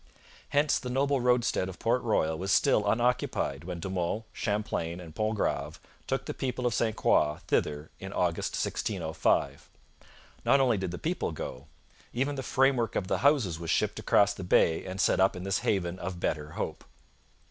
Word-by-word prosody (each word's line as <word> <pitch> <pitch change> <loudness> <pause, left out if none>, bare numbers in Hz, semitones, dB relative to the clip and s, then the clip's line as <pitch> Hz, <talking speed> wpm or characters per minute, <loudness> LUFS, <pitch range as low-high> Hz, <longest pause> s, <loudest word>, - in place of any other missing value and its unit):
Hence 145 +1 +2
the 125 - -6
noble 135 +1 +1
roadstead 125 -6 +2
of 95 - -9
Port 120 +2 +1
Royal 80 -9 +1
was 95 +4 -3
still 105 -6 +3
unoccupied 120 - 0
when 90 -1 -5
De 90 - -4
Monts, 95 +4 -2
Champlain, 105 -5 -2
and 85 -3 -10
Pontgrave 80 -8 -1 0.3
took - - -1
the - - -4
people 125 -1 -3
of 120 - +2
St 115 -2 0
Croix 75 -6 +2
thither 75 +1 -1
in - - -7
August - - -1
1605. 85 -7 -1 0.7
Not 140 - +4
only 125 -6 +3
did 95 -1 -2
the 90 - -5
people 170 - -2
go. 70 -3 -7 0.5
Even 135 +4 0
the 135 - -4
framework 130 -3 +2
of 95 - -1
the - - +1
houses 130 - +2
was 85 -1 -6
shipped - - +1
across 100 0 +3
the 100 - -7
bay 80 -2 +3
and 95 +1 -6
set - - +3
up 95 +1 +4
in 90 - -6
this 95 0 0
haven 90 -3 -1
of 90 0 -5
better 75 -2 -2
hope. - - -4
100 Hz, 180 wpm, -29 LUFS, 85-125 Hz, 0.7 s, Not